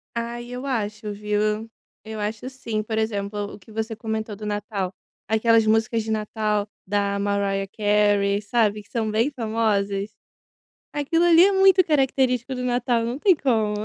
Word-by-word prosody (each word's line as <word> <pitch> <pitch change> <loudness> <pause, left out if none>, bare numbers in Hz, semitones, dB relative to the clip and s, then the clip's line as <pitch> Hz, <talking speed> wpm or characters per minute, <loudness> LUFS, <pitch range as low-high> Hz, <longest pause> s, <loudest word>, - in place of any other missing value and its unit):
Ai, 235 +1 -4
eu 250 +2 -6
acho 215 -4 -3
viu. 210 +1 -1 0.3
Eu 220 0 -7
acho 215 +4 -3
sim. 230 -5 -3
Por 220 +1 -3
exemplo 205 -2 -2
o - - -11
que 205 - -17
você 220 +1 -3
comentou 220 -1 -4
do 210 +1 -8
Natal. 205 -2 -3 0.3
Aquelas 225 +1 +3
músicas 225 +1 +2
de 220 - -4
Natal 215 -1 -1 0.2
da 200 0 0
Mariah 200 -1 0
Carey, 205 -1 +2
sabe? 210 -1 +1
Que - - -27
são 220 -2 -1
bem 225 +5 +2
famosas. 215 -5 0 0.8
Aquilo 295 +4 +1
ali 345 0 +7
é 400 - +4
muito 385 -1 +6
característico 265 -4 +1
do 250 0 -4
Natal. 245 -1 +1
Não 240 +3 -3
tem 375 +4 +5
como. 225 -8 +1
220 Hz, 160 wpm, -23 LUFS, 205-240 Hz, 0.8 s, ali